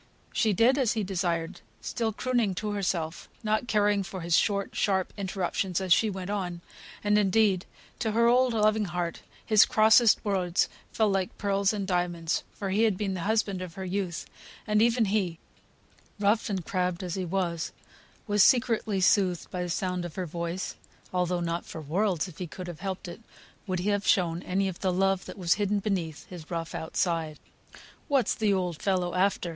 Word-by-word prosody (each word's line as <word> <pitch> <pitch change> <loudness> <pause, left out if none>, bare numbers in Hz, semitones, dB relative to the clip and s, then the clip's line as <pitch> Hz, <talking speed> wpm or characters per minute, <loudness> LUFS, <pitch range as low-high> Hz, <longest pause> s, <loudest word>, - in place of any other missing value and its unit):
She 220 - +2
did 235 +8 +4
as 245 -5 +2
he 220 - -1
desired, 175 -2 -2 0.2
still 225 -2 -2
crooning 230 -3 0
to 210 +2 -3
herself, 180 -5 -2
not 215 +2 0
caring 205 -2 +2
for 190 -1 -6
his 170 0 +2
short, 200 -2 +1
sharp 190 -2 0
interruptions 190 -2 -2
as 185 -2 +4
she 220 - +3
went 190 -1 -5
on; 180 -4 -3 0.4
and, 210 0 +3
indeed, 195 -2 +2 0.3
to 220 -2 -1
her 235 +1 +3
old, 250 +1 +4
loving 215 0 +3
heart, 175 -2 -3 0.2
his 215 -3 +7
crossest 220 +1 +5
words 185 -4 +1 0.2
fell 215 -2 +2
like 190 -2 -1
pearls 200 -1 +1
and 205 -2 -3
diamonds, 175 -3 0
for 195 -2 -4
he 205 +3 +2
had 220 -5 +3
been 195 -2 -1
the 185 - -4
husband 205 -4 +1
of 180 -3 -7
her 190 - -5
youth; 185 -2 -3 0.4
and 210 -1 +2
even 230 0 +3
he, 190 -5 0 0.8
rough 210 +4 +2
and 190 -5 -2
crabbed 180 -1 -1
as 180 -2 -4
he 190 - -2
was, 170 -2 -2 0.5
was 205 -1 +4
secretly 230 -6 +3
soothed 185 -2 +2
by 180 - -3
the 180 - -3
sound 180 +1 -1
of 175 -3 -7
her 185 - -2
voice, 170 +2 -4 0.4
although 180 -1 0
not 170 0 -2
for 160 - -8
worlds, 175 +3 0
if 180 - -12
he 180 - -4
could 185 +3 -8
have 175 -3 -8
helped 190 -2 -4
it, 175 - -9 0.5
would 185 -1 -1
he 180 +4 -1
have 205 -1 0
shown 175 -2 +2
any 195 +2 0
of 185 -2 -5
the 190 - +1
love 195 +1 +1
that - - -9
was 175 -3 +3
hidden 205 0 +1
beneath 185 -7 -2
his 170 -4 -10
rough 165 -1 -4
outside. 160 -1 -1 0.7
"What's 275 -4 +2
the 215 -3 +1
old 180 -4 -1
fellow 185 -3 0
after?" 185 -1 +1
190 Hz, 185 wpm, -28 LUFS, 175-210 Hz, 0.8 s, his